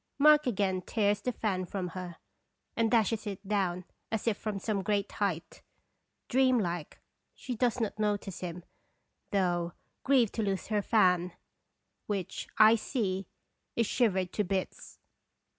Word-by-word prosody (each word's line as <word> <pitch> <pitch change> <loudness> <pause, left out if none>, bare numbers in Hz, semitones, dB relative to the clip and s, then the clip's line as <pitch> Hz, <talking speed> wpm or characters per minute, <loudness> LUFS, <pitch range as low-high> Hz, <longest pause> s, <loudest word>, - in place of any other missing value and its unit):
Mark 300 0 +6
again 195 -5 0
tears 205 +1 +1
the 250 - -1
fan 200 -6 -1
from 180 0 -4
her, 180 -1 -7 0.6
and 230 -1 +2
dashes 225 -1 +2
it 195 0 -6
down 185 -3 0 0.3
as 220 0 -2
if 225 - +3
from 210 -1 -4
some 200 0 -1
great 200 0 0
height. 185 -6 -3 0.7
Dream 255 0 +4
like, 175 -7 -3 0.4
she 255 - -5
does 245 +1 +1
not 220 -2 -2
notice 205 -3 -1
him, 175 -1 -6 0.7
though 175 -3 0 0.3
grieved 260 -6 +3
to 225 - -1
lose 195 -2 -2
her 210 -1 +1
fan, 180 -5 +3 0.7
which, 195 -3 -3
I 215 +1 +8
see, 195 -6 -2 0.5
is 230 - +2
shivered 190 -6 +1
to 210 - +1
bits. 190 0 -4
205 Hz, 140 wpm, -30 LUFS, 185-225 Hz, 0.7 s, I